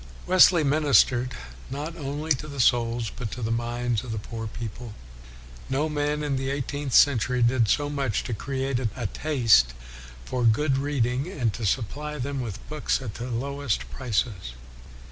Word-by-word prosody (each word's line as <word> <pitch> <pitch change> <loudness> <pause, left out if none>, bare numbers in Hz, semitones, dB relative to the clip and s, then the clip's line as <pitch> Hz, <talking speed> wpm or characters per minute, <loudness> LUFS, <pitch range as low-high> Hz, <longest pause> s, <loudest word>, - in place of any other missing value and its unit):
Wesley 180 -2 +6
ministered 135 -4 +3 0.3
not 150 +5 -5
only 150 +1 -4
to 150 +2 +1
the 140 -2 -7
souls 120 -2 +2
but 115 -2 -4
to 125 - -6
the 110 - -1
minds 120 -1 -1
of 125 - -6
the 110 - -3
poor 115 +1 -5
people. 115 0 -7 0.4
" - - -17 0.3
No 140 +4 +1
man 150 0 -1
in 140 -2 -1
the 135 0 -2
eighteenth 140 0 -3
century 125 -2 +4
did 120 -1 +3
so 145 +6 +2
much 140 -6 -1
to 120 - -4
create 135 +2 -2
a 120 0 -3
taste 110 - +3 0.5
for 125 -1 -2
good 135 +4 +3
reading, 135 -1 0
and 125 - -1
to 110 -1 -2
supply 150 +8 -2
them 140 0 -3
with 110 -6 -7
books 155 0 -1
at 120 -6 -6
the 120 +4 -6
lowest 125 - -2
prices." 100 - -2
130 Hz, 165 wpm, -26 LUFS, 115-145 Hz, 0.5 s, Wesley